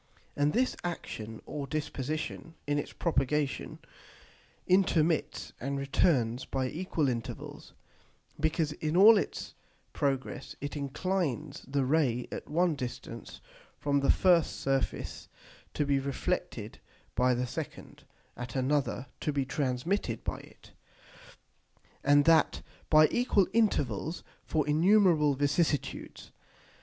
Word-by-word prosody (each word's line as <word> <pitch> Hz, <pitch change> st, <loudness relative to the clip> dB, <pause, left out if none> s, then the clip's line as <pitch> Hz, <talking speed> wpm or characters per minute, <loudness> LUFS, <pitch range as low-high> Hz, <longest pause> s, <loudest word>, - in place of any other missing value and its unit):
And 145 Hz, +1 st, +2 dB
this 255 Hz, +6 st, +1 dB
action 110 Hz, -10 st, -5 dB
or 145 Hz, -2 st, -5 dB
disposition, 155 Hz, +2 st, -4 dB
in 145 Hz, 0 st, +1 dB
its -, -, -5 dB
propagation, 150 Hz, -3 st, -1 dB, 0.9 s
intermits 170 Hz, -4 st, +2 dB
and 140 Hz, +3 st, -2 dB
returns 135 Hz, -3 st, +1 dB
by 130 Hz, -1 st, -2 dB
equal 165 Hz, -2 st, -1 dB
Intervals, 120 Hz, -3 st, -5 dB, 0.7 s
because 155 Hz, 0 st, +1 dB
in 155 Hz, +2 st, -2 dB
all 215 Hz, +4 st, +9 dB
its -, -, -5 dB, 0.4 s
progress 135 Hz, -2 st, -2 dB
it 145 Hz, +1 st, -5 dB
inclines 150 Hz, 0 st, -2 dB
the 135 Hz, 0 st, 0 dB
Ray 130 Hz, -4 st, +1 dB
at -, -, -6 dB
one 170 Hz, +2 st, +2 dB
distance 125 Hz, -4 st, -7 dB, 0.4 s
from 140 Hz, -1 st, +1 dB
the 140 Hz, -, 0 dB
first 175 Hz, -4 st, +4 dB
Surface 135 Hz, -1 st, -2 dB, 0.5 s
to 150 Hz, -, +1 dB
be 140 Hz, -1 st, +2 dB
reflected 135 Hz, 0 st, -3 dB, 0.3 s
by 125 Hz, +2 st, +3 dB
the 125 Hz, +1 st, -1 dB
second, 120 Hz, -, -7 dB, 0.3 s
at 125 Hz, +1 st, -7 dB
another 135 Hz, -1 st, 0 dB
to 150 Hz, -, -1 dB
be 140 Hz, -2 st, 0 dB
transmitted 130 Hz, -, -1 dB
by -, -, -3 dB
it, -, -, -17 dB, 1.3 s
and 145 Hz, 0 st, +5 dB
that 165 Hz, -2 st, +4 dB, 0.3 s
by 155 Hz, 0 st, +7 dB
equal 240 Hz, -6 st, +3 dB
Intervals 160 Hz, -, +1 dB, 0.2 s
for 155 Hz, -2 st, 0 dB
innumerable 160 Hz, -2 st, +4 dB
vicissitudes. 145 Hz, +1 st, -1 dB
145 Hz, 115 wpm, -30 LUFS, 135-165 Hz, 1.3 s, all